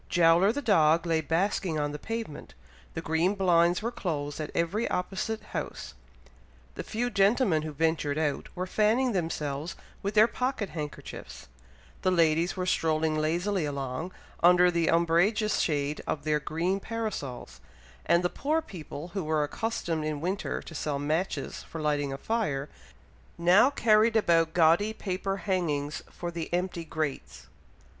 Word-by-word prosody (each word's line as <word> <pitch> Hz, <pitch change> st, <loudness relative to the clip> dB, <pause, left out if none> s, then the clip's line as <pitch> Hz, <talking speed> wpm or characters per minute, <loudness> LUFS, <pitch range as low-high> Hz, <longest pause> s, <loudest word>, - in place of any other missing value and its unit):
Jowler 175 Hz, +3 st, +5 dB
the 285 Hz, +4 st, -4 dB
dog 165 Hz, -6 st, +4 dB
lay 165 Hz, -2 st, +1 dB
basking 165 Hz, +1 st, 0 dB
on 145 Hz, 0 st, -1 dB
the 150 Hz, -, -6 dB
pavement; 225 Hz, -9 st, -6 dB, 0.4 s
the 160 Hz, -, -4 dB
green 165 Hz, +5 st, +1 dB
blinds 175 Hz, -1 st, +3 dB
were 235 Hz, -, -1 dB
closed 145 Hz, -9 st, -3 dB
at 150 Hz, -, -4 dB
every 195 Hz, +8 st, 0 dB
opposite 205 Hz, +4 st, -2 dB
house; -, -, -5 dB, 0.8 s
the -, -, -5 dB
few 245 Hz, +3 st, -2 dB
gentlemen 200 Hz, -, +3 dB
who 155 Hz, 0 st, -5 dB
ventured 155 Hz, -1 st, 0 dB
out, 150 Hz, -3 st, -1 dB
were 180 Hz, -, -2 dB
fanning 220 Hz, +6 st, +2 dB
themselves 160 Hz, -4 st, -3 dB, 0.3 s
with 200 Hz, +2 st, -3 dB
their 215 Hz, +1 st, +8 dB
pocket 250 Hz, -3 st, -2 dB
handkerchiefs; 150 Hz, -2 st, -7 dB, 0.5 s
the 185 Hz, -, +2 dB
ladies 170 Hz, 0 st, +2 dB
were 185 Hz, -, -1 dB
strolling 160 Hz, -3 st, +1 dB
lazily 175 Hz, +5 st, 0 dB
along, 140 Hz, +3 st, -3 dB, 0.3 s
under 180 Hz, +1 st, +6 dB
the 170 Hz, -1 st, +1 dB
umbrageous 175 Hz, +6 st, +2 dB
shade 145 Hz, -1 st, 0 dB
of 145 Hz, -, -2 dB
their 150 Hz, -1 st, +1 dB
green 170 Hz, +6 st, -1 dB
parasols; 210 Hz, -, -5 dB, 0.4 s
and 170 Hz, +2 st, +3 dB
the -, -, +3 dB
poor 300 Hz, -, 0 dB
people 175 Hz, -, -8 dB
who 195 Hz, 0 st, -3 dB
were 155 Hz, -1 st, +1 dB
accustomed 165 Hz, -2 st, -2 dB
in 155 Hz, -1 st, -2 dB
winter 185 Hz, +5 st, -2 dB
to -, -, -10 dB
sell 150 Hz, -2 st, -2 dB
matches 155 Hz, +6 st, -2 dB
for 165 Hz, -, -8 dB
lighting 145 Hz, -2 st, 0 dB
a 135 Hz, -, -4 dB
fire, 150 Hz, -9 st, -2 dB, 0.7 s
now 180 Hz, +9 st, +5 dB
carried 225 Hz, -4 st, +3 dB
about 165 Hz, -6 st, +3 dB
gaudy 175 Hz, +6 st, +4 dB
paper 195 Hz, -1 st, -3 dB
hangings 160 Hz, -7 st, -1 dB
for 175 Hz, 0 st, -6 dB
the 170 Hz, -1 st, -5 dB
empty 175 Hz, -1 st, -1 dB
grates. 150 Hz, -, -4 dB
170 Hz, 150 wpm, -28 LUFS, 155-200 Hz, 0.8 s, their